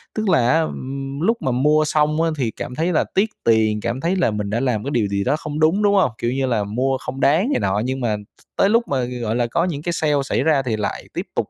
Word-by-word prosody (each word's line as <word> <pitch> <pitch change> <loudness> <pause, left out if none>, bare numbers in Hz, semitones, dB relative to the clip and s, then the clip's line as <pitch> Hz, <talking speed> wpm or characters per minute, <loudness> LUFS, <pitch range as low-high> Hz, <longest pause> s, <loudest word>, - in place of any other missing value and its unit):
Tức 215 -2 -1
là 125 -9 +3
á, 160 - +4
ừm, 135 -2 -5
lúc 225 +7 +2
mà 130 - 0
mua 150 +5 +3
xong 150 +1 +1
á, 165 - +2
thì 120 -5 -1
cảm 125 - -7
thấy 165 +5 0
là 155 - +3
tiếc 205 +3 +3
tiền, 110 -2 +2
cảm 120 +4 -3
thấy 170 +5 0
là 180 -11 +1
mình 105 -1 -3
đã 110 +3 -1
làm 120 -5 0
cái 140 - -4
điều 115 -6 +1
gì 100 0 -1
đó 145 - +1
không 150 0 -5
đúng, 165 +7 +3
đúng 205 0 +4
hông? 185 - +3
Kiểu 120 - -1
như 135 +1 0
là 115 -5 0
mua 130 +6 -1
không 130 +1 -7
đáng 160 - +3
này - - +1
nọ, 95 +1 0
nhưng 130 +1 -2
mà 115 -3 0
th 105 0 -16 0.2
tới 195 - +4
lúc 230 +2 +2
mà, 130 -3 0
gọi 120 -2 -3
là, 120 -1 +1
có 165 +8 0
những 155 -6 -3
cái 175 +2 -2
sale 155 -2 +1
xảy 135 - -1
ra 150 -2 +3
thì 120 -4 -2
lại 105 - -3
tiếp - - -4
tục - - -1
135 Hz, 285 wpm, -21 LUFS, 115-160 Hz, 0.2 s, á